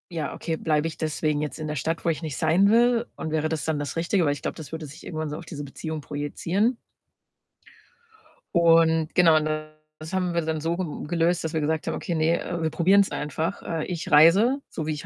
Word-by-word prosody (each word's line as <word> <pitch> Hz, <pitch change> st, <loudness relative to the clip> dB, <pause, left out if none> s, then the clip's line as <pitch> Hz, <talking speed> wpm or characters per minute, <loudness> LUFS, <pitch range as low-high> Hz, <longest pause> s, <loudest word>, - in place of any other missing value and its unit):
„Ja, 155 Hz, -3 st, -3 dB
okay, 165 Hz, -, -3 dB
bleibe 155 Hz, 0 st, +1 dB
ich 160 Hz, -, -7 dB
deswegen 155 Hz, -1 st, -1 dB
jetzt 150 Hz, +1 st, -4 dB
in 155 Hz, -, -4 dB
der 150 Hz, -, -3 dB
Stadt, 165 Hz, +5 st, -2 dB
wo 170 Hz, -, +3 dB
ich 155 Hz, -4 st, -1 dB
nicht 155 Hz, -4 st, -5 dB
sein 175 Hz, +6 st, +3 dB
will 235 Hz, +1 st, +4 dB
und 160 Hz, -, -5 dB
wäre 155 Hz, 0 st, 0 dB
das 160 Hz, -2 st, -3 dB
dann 160 Hz, -2 st, 0 dB
das 145 Hz, -1 st, -4 dB
Richtige?” 170 Hz, +1 st, +1 dB
Weil 145 Hz, -, +2 dB
ich 145 Hz, -, -8 dB
glaube, -, -, -3 dB
das 160 Hz, -, -10 dB
würde 160 Hz, -1 st, -5 dB
sich 145 Hz, +2 st, -12 dB
irgendwann 155 Hz, -2 st, -4 dB
so 150 Hz, -, -5 dB
auf 170 Hz, -, -10 dB
diese 145 Hz, -2 st, -7 dB
Beziehung 155 Hz, +2 st, -6 dB
projizieren. 170 Hz, -, -1 dB, 1.8 s
Und, 165 Hz, -2 st, +4 dB
genau, 165 Hz, -3 st, +6 dB
und 155 Hz, -, 0 dB, 0.5 s
das 160 Hz, +4 st, -9 dB
haben 180 Hz, -2 st, 0 dB
wir 170 Hz, -, +2 dB
dann 160 Hz, -1 st, -2 dB
so 165 Hz, +2 st, -1 dB
ge 185 Hz, -, -1 dB, 0.2 s
gelöst, 170 Hz, +1 st, +1 dB
dass 160 Hz, 0 st, -3 dB
wir 160 Hz, -, 0 dB
gesagt 155 Hz, +2 st, -1 dB
haben: 160 Hz, -, -1 dB
„Okay, 170 Hz, -, -4 dB
ne, 160 Hz, +1 st, +2 dB
äh, 175 Hz, -1 st, -4 dB
wir 160 Hz, -, +1 dB
probieren's 195 Hz, +5 st, +3 dB
einfach.” 160 Hz, +5 st, -3 dB
Äh, 165 Hz, -2 st, -3 dB
ich 175 Hz, -3 st, -5 dB
reise, 190 Hz, -, +6 dB
so 155 Hz, -, -5 dB
wie 155 Hz, -, -1 dB
ich 150 Hz, -, -7 dB
160 Hz, 230 wpm, -25 LUFS, 155-170 Hz, 1.8 s, genau